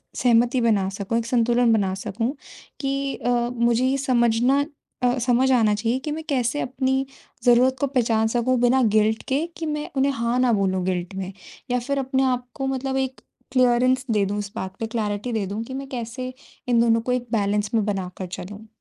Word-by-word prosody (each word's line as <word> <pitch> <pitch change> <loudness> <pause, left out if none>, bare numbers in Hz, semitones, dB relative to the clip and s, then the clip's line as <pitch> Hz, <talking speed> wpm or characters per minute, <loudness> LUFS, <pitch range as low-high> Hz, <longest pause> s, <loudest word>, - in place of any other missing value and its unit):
सहमति 245 +1 +3
बना 210 -5 +2
सकूँ, 200 +3 -2
एक 230 - -1
संतुलन 240 0 +3
बना 195 -3 +1
सकूँ 225 +8 -3 0.5
कि 275 0 -1
अ, 245 - -3 0.2
मुझे 235 +1 +2
ये 270 +1 +2
समझना 250 +1 +2 0.4
अ, 245 +1 +3
समझ 250 +2 +2
आना 220 -4 +4
चाहिए 230 +4 0
कि 300 - -2
मैं 315 +1 -4
कैसे 255 +1 0
अपनी 265 +1 0 0.4
ज़रूरत 250 +2 +5
को 280 - +2
पहचान 230 -4 +1
सकूँ 245 +2 +1
बिना 255 +2 +4
गिल्ट 215 +1 +2
के 285 +5 +1
कि 325 - -4
मैं 300 -1 -3
उन्हें 275 +1 +3
हाँ 235 0 -1
ना 250 -2 +3
बोलूँ 190 -2 +1
गिल्ट 180 0 -2
में, 190 0 -4 0.4
या 250 - +2
फिर 275 +3 -2
अपने 265 0 0
आप 250 -1 0
को 270 -1 -2
मतलब 265 0 -2
एक 265 0 -2 0.3
क्लीयरेंस 255 +1 +3
दे 205 -2 +2
दूँ 205 +2 -2
इस 200 -1 -5
बात 190 0 -5
पे, 225 - -1
क्लैरिटी 215 +1 -2
दे 210 -3 0
दूँ 210 +3 -4
कि 260 - -8
मैं 270 0 -5
कैसे 255 +1 -5 0.4
इन 235 -1 +4
दोनों 230 -1 +3
को 250 - -2
एक 245 -1 -1
बैलेंस 205 -1 0
में 215 -2 +2
बना 195 -3 -2
कर 185 - -5
चलूँ। 205 +4 -8
240 Hz, 200 wpm, -23 LUFS, 215-260 Hz, 0.5 s, ज़रूरत